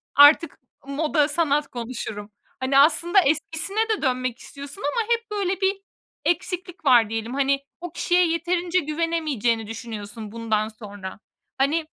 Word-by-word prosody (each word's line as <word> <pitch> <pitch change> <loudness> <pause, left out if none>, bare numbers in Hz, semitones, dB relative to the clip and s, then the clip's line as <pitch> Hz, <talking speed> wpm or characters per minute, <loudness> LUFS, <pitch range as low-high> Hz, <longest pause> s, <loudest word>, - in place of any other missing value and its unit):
"Artık 290 +2 +7 0.3
moda, 300 +1 +1
sanat 295 -1 +1
konuşurum." 225 -4 -6 0.3
Hani, 260 +1 +1
aslında 335 +6 +5
eskisine 330 +8 0
de 435 - 0
dönmek 255 -3 -1
istiyorsun 280 +7 -10
ama 460 +3 -1
hep, 465 -1 -4
böyle, 390 -2 -1
bir 390 +1 +1 0.4
eksiklik 360 -1 -2
var 240 -5 +6
diyelim. 225 +2 -3
Hani, 275 0 +1 0.2
o 350 -1 -6
kişiye 355 +1 +2
yeterince 345 +2 0
güvenemeyeceğini 300 - -1
düşünüyorsun 220 -1 -7
bundan 220 -2 -1
sonra. 205 -3 -9 0.4
Hani, 295 +4 +1
290 Hz, 130 wpm, -24 LUFS, 235-345 Hz, 0.4 s, Artık